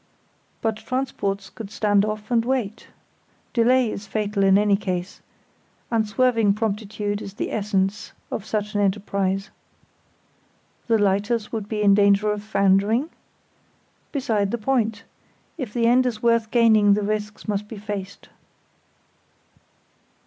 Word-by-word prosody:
But 220 Hz, -1 st, 0 dB
transports 225 Hz, -6 st, -3 dB
could 220 Hz, -3 st, -8 dB
stand 205 Hz, -1 st, +2 dB
off 215 Hz, +1 st, -5 dB
and 230 Hz, -1 st, +3 dB
wait. 235 Hz, -4 st, -2 dB, 0.7 s
Delay 245 Hz, 0 st, +3 dB
is 200 Hz, 0 st, -7 dB
fatal 210 Hz, -1 st, -1 dB
in 195 Hz, 0 st, +5 dB
any 205 Hz, -1 st, +3 dB
case; 185 Hz, -2 st, -4 dB, 0.7 s
unswerving 225 Hz, -1 st, +2 dB
promptitude 210 Hz, -1 st, -2 dB
is 195 Hz, -, -8 dB
the -, -, -3 dB
essence 205 Hz, 0 st, -1 dB, 0.2 s
of 215 Hz, -, -3 dB
such 210 Hz, 0 st, -3 dB
an 205 Hz, -, +1 dB
enterprise. 195 Hz, -1 st, -1 dB, 1.4 s
The 230 Hz, -1 st, +3 dB
lighters 205 Hz, +2 st, 0 dB
would 215 Hz, -3 st, -4 dB
be 210 Hz, -1 st, -1 dB
in 200 Hz, -1 st, +6 dB
danger 200 Hz, +1 st, +4 dB
of 210 Hz, 0 st, -3 dB
foundering? 205 Hz, -, +2 dB, 1.0 s
Beside 220 Hz, -8 st, 0 dB
the 235 Hz, -, -1 dB
point; 225 Hz, -2 st, 0 dB, 0.5 s
if 260 Hz, -10 st, -5 dB
the 235 Hz, +1 st, 0 dB
end 250 Hz, +2 st, +4 dB
is 225 Hz, -3 st, -4 dB
worth 230 Hz, -2 st, +2 dB
gaining 220 Hz, -4 st, +5 dB
the 210 Hz, -, -1 dB
risks 210 Hz, +1 st, -3 dB
must 210 Hz, 0 st, -2 dB
be 220 Hz, -, -8 dB
faced. 200 Hz, -2 st, -6 dB
210 Hz, 130 wpm, -23 LUFS, 200-225 Hz, 1.4 s, in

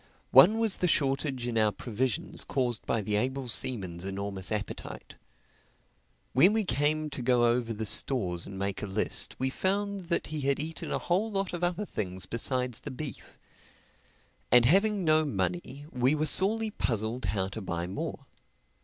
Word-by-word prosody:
One 170 Hz, -, +8 dB
was 225 Hz, -3 st, +1 dB
the 180 Hz, -, +1 dB
shortage 135 Hz, -4 st, 0 dB
in 115 Hz, -2 st, 0 dB
our 110 Hz, -1 st, +3 dB
provisions 120 Hz, +3 st, -2 dB
caused 125 Hz, -4 st, -2 dB
by 115 Hz, -, +1 dB
the 105 Hz, +1 st, -1 dB
able 130 Hz, +3 st, -1 dB
seaman's 95 Hz, -8 st, 0 dB
enormous 100 Hz, 0 st, -3 dB
appetite. 105 Hz, -1 st, -5 dB, 1.2 s
When 175 Hz, -, +6 dB
we 220 Hz, 0 st, +2 dB
came 155 Hz, -2 st, 0 dB
to 135 Hz, -, -4 dB
go 120 Hz, -1 st, +3 dB
over 120 Hz, 0 st, +1 dB
the 110 Hz, 0 st, -3 dB
stores 95 Hz, -7 st, 0 dB
and 95 Hz, -, -8 dB
make 100 Hz, 0 st, -3 dB
a 105 Hz, -, -3 dB
list, 95 Hz, +2 st, -2 dB
we 130 Hz, +1 st, -1 dB
found 200 Hz, +3 st, -1 dB
that 170 Hz, -, 0 dB
he 155 Hz, -, -2 dB
had 140 Hz, 0 st, +1 dB
eaten 160 Hz, +2 st, -4 dB
a -, -, +1 dB
whole 190 Hz, +6 st, 0 dB
lot 195 Hz, -3 st, -2 dB
of 175 Hz, 0 st, -4 dB
other 180 Hz, +4 st, 0 dB
things 95 Hz, -, -4 dB
besides 125 Hz, +3 st, -2 dB
the 145 Hz, -, -7 dB
beef. 140 Hz, +1 st, -8 dB, 1.1 s
And 120 Hz, 0 st, +7 dB
having 200 Hz, -, +3 dB
no 155 Hz, -1 st, +4 dB
money, 95 Hz, -, -3 dB
we 130 Hz, +3 st, +2 dB
were 155 Hz, 0 st, 0 dB
sorely 215 Hz, +6 st, +3 dB
puzzled 115 Hz, -, -1 dB
how 95 Hz, 0 st, -1 dB
to 110 Hz, +3 st, -7 dB
buy 85 Hz, -2 st, -3 dB
more. 95 Hz, +3 st, -5 dB
130 Hz, 170 wpm, -29 LUFS, 105-155 Hz, 1.2 s, One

